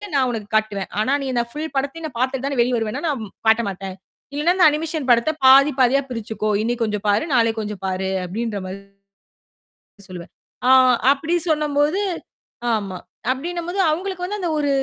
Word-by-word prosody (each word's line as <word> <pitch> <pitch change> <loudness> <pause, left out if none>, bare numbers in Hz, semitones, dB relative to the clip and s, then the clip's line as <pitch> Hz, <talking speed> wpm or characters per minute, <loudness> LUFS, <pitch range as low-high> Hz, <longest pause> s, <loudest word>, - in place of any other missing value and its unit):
நான் 260 -2 +3
உனக்குக் 215 -2 -6
காட்டுவேன். 210 -3 0
ஆனா 220 +5 +1
நீ - - -3
இந்தப் 235 -1 -1
ஃபுல் 305 0 -5
படத்தையும் 280 +4 -2
நான் 245 -6 -10
பாத்துட்டு 260 +1 -1
தான் 280 - -1
நான் 245 - +2
வெளிய 250 +1 0
வருவேன்னா, 225 +7 -3
நான் 265 -7 -2 0.2
காட்டமாட்டேன். 200 -4 +1 0.4
இல்லைன்னா 300 +5 +2
அந்த 355 - +6
அனிமேஷன் 310 -2 -3
படத்த 235 +5 +4 0.2
பாதி, 275 +3 +8
பாதியா 260 +2 +4
பிரிச்சுக்கோ. 220 -2 -3
இன்னைக்கு 235 +1 -1
கொஞ்சம் 210 -1 -3
பாரு. 205 +6 +2
நாளைக்கு 225 -1 +2
கொஞ்சம் 210 -2 -6
பாரு." 190 0 -2 0.2
அப்படீன்ற 210 +3 -3
மாரி 190 +1 -6 1.3
சொல்லுவேன். 175 -2 -9 0.4
ஆ - - +5 0.4
அப்படி 315 +4 -3 0.2
சொன்னம்போது 300 +3 +1 0.7
ஆமா. 195 -4 -2 0.3
அப்படீன்னும் 340 +6 -4
போது 380 +3 -3
அவங்களுக்கு 365 +2 -3
வந்து 415 +3 -4
அந்த 350 -3 -2
ஒரு 290 -1 0
250 Hz, 170 wpm, -21 LUFS, 215-300 Hz, 1.3 s, பாதி